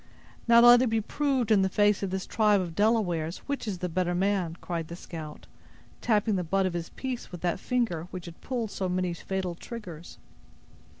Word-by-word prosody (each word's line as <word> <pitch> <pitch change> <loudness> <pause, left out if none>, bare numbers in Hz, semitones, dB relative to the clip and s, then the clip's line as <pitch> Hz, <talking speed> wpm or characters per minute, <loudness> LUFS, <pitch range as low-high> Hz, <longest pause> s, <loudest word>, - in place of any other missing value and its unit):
"Now 235 0 +7
let 240 0 +8
it 255 - +2
be 225 0 +1
proved, 260 0 0
in 205 -3 +5
the 190 - +2
face 205 +1 +3
of 195 - -2
this 190 0 -3
tribe 210 -2 +3
of 175 -3 -4
Delawares, 180 -5 +1
which 280 -4 -3
is 200 -3 -2
the 180 +1 -3
better 175 +1 -1
man," 185 -3 0
cried 170 -2 -4
the 170 - -7
scout, 160 -4 -9 0.6
tapping 215 -2 +2
the 180 - -1
butt 195 +3 +1
of 185 - -1
his 170 -1 -4
piece 255 -2 -5
with 175 - -8
that 175 0 -1
finger 210 -11 -1
which 185 -2 -7
had 170 -1 -11
pulled 235 -5 -3
so 190 -1 -2
many 180 -1 -1
fatal 185 +1 -3
triggers. 175 -4 -9
190 Hz, 200 wpm, -28 LUFS, 175-220 Hz, 0.6 s, let